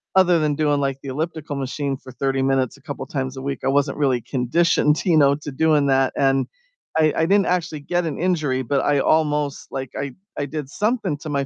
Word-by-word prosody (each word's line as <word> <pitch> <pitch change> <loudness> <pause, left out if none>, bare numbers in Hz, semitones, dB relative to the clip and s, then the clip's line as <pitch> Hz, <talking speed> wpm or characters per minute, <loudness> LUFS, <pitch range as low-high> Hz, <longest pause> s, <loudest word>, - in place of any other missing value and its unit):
other 180 -3 +5
than 150 -2 +1
doing, 145 -1 +1
like, 135 -1 -1
the 140 - -9
elliptical 155 +1 -4
machine 140 +1 -2
for 130 - -12
30 135 +2 -1
minutes 135 0 +1
a - - -21
couple 145 - -6
times 130 -1 -4
a - - -5
week, 135 -1 -3
I - - 0
wasn't 140 +1 +1
really 130 -5 +1
conditioned, 150 - +1
you 170 -3 +3
know, 140 -1 +5
to 150 0 -7
doing 150 0 +2
that 135 -1 +2
and 135 -1 +2 0.5
I 155 -2 +4
I 160 - +2
didn't 200 +1 +4
actually 170 -4 -1
get 175 +3 -1
an 155 - -4
injury, 155 -8 0
but 135 +3 0
I 145 -1 +2
almost 150 -2 +1
Like, 135 -2 -5
I 140 -2 -4 0.2
I 145 - -1
did 145 -1 -5
something 210 - -1
to 155 - -7
my 140 -1 0
145 Hz, 220 wpm, -22 LUFS, 135-155 Hz, 0.5 s, other